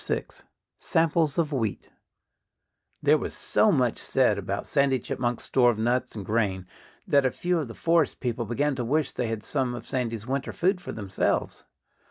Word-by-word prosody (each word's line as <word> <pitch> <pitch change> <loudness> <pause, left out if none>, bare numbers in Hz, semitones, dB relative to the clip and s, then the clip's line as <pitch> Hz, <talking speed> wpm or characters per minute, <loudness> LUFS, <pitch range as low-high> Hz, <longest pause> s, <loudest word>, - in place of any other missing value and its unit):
VI - - -1 0.6
SAMPLES 165 -3 +1
OF 160 -3 +1
WHEAT 115 -7 -2 1.1
There - - +5
was - - -5
so - - +3
much - - +1
said - - +2
about - - -3
Sandy 140 -1 +2
Chipmunk's 120 0 -3
store 125 -2 +4
of 115 - 0
nuts 120 +3 0
and 100 -3 -6
grain 100 -4 0 0.4
that 140 -1 +4
a 130 - +3
few 175 +6 -1
of 150 - -3
the 115 - -9
forest 165 -2 +2
people 120 -2 -2
began 140 +6 0
to 125 - -1
wish 145 +4 0
they 125 - -2
had 110 -1 -3
some 130 -4 -1
of 120 - -9
Sandy's 115 -4 -2
winter 135 +2 -2
food 180 +1 +1
for - - -6
themselves. 100 -3 -2
125 Hz, 180 wpm, -26 LUFS, 115-150 Hz, 1.1 s, There